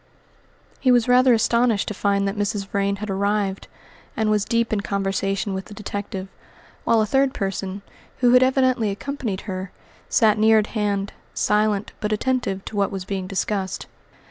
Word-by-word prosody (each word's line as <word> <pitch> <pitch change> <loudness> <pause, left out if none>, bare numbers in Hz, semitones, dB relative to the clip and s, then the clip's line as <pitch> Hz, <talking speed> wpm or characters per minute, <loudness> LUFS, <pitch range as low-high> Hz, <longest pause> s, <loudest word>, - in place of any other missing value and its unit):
He 255 - +3
was 245 -1 +4
rather 250 +1 +5
astonished 235 -1 +2
to - - -3
find 200 0 +1
that 195 - -2
Mrs. 205 -1 -1
Vrain 200 -1 0
had 210 0 -5
arrived, 200 0 -1 0.5
and 220 -1 +1
was 210 -1 +2
deep 230 -1 0
in 205 - +1
conversation 195 0 -1
with 190 0 -4
the 205 - -11
detective, 200 -2 -5 0.6
while 230 -1 +4
a - - +2
third 270 +4 +2
person, 195 0 -3 0.3
who 245 -1 +4
had 250 - +7
evidently 255 -4 +2
accompanied 215 -1 -4
her, 185 -2 -5 0.4
sat 220 -3 +4
near 220 +1 +6
at 215 - +3
hand, 205 -2 -1 0.2
silent, 210 -1 +1
but 210 0 -2
attentive 215 -4 -1
to - - -7
what 200 -1 +1
was 190 -2 -5
being 190 -1 -3
discussed. 195 0 -2
205 Hz, 170 wpm, -23 LUFS, 195-225 Hz, 0.6 s, had